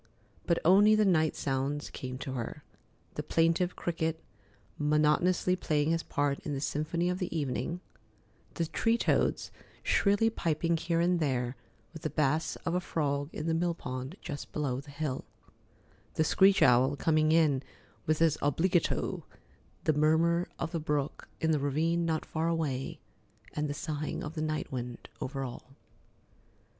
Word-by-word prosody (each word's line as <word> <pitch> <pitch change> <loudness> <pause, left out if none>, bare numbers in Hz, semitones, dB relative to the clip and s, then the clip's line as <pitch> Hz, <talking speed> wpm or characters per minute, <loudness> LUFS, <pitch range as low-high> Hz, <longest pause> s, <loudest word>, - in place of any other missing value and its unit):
But 170 - +3
only 205 +5 +7
the 215 0 +4
night 160 -5 +3
sounds 140 +2 -2
came 130 0 -6
to 135 - -5
her—the 125 -3 -8
plaintive 165 +2 +1
cricket 160 -1 -2 0.6
monotonously 150 +5 +3
playing 155 -4 +1
his 165 0 +1
part 145 -2 -1
in 145 - -4
the - - -2
symphony 155 +4 -1
of 180 +1 -1
the 180 - -2
evening; 155 +5 -2 0.7
the 170 - 0
tree 225 +9 +1
toads - - +1 0.3
shrilly 205 +3 +3
piping 165 -3 0
here 165 +1 0
and 175 +1 +2
there, 130 -4 0 0.4
with 160 - -9
the 155 - -2
bass 150 +2 +1
of 165 - 0
a 180 - +2
frog 145 -4 -1
in 150 - -5
the 165 - +1
mill 170 +1 +1
pond 130 +2 -5
just 145 -3 -6
below 135 -4 -1
the 145 - -15
hill; 140 -2 -3 0.9
the 160 - +3
screech 190 +5 +5
owl 130 +3 +5
coming 155 +1 +2
in 155 -5 +4 0.5
with 155 0 +3
his 160 -2 +3
obligato; 165 +5 +1 0.6
the 155 - +3
murmur 165 +3 +3
of 165 - -3
the 165 - -1
brook 150 -1 -2
in 160 - +1
the 150 - +2
ravine 165 +5 +1
not 160 -1 -1
far 160 +1 -1
away; 150 -6 -2 0.5
and 150 -1 -1
the 145 - -3
sighing 155 -1 -3
of 150 - -5
the 155 - -4
night 155 0 -2
wind 125 -2 -5
over 135 0 -3
all. 130 +1 -8
155 Hz, 155 wpm, -30 LUFS, 145-170 Hz, 0.9 s, only